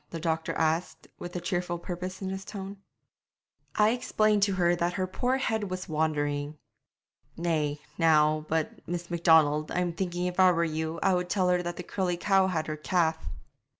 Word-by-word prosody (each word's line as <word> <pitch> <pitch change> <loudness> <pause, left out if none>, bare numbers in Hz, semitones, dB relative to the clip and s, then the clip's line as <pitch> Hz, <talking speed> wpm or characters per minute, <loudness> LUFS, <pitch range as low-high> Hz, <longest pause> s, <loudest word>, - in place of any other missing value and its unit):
the 165 - -5
doctor 160 0 -1
asked, 160 +2 -1
with 175 0 -7
a - - -1
cheerful 175 0 -2
purpose 185 +2 -6
in 190 - -2
his 190 0 -5
tone. 200 0 -7 1.0
'I 215 +1 +4
explained 215 -3 +1
to 200 0 +3
her 175 -1 +2
that 175 0 -1
her 185 0 -1
poor 250 +7 0
head 220 -6 -1
was 185 +1 -5
wandering.' 150 -2 -1 0.8
'Nay, 155 -3 0 0.2
now, 155 -2 +4
but, 160 -1 -1
Miss 175 0 -4
Macdonald, 160 -3 +4
I'm 180 -1 0
thinking 175 0 -2
if 180 +1 -3
I 185 -1 +7
were 170 0 +1
you 160 0 -2
I 190 - +4
would 180 0 -1
tell 185 -2 +2
her 180 0 +2
that 175 0 -4
the 180 - -5
curly 180 -1 -2
cow 195 +1 +3
had 165 -4 -1
her 155 -1 -4
calf.' 160 - 0
175 Hz, 185 wpm, -28 LUFS, 160-185 Hz, 1.0 s, I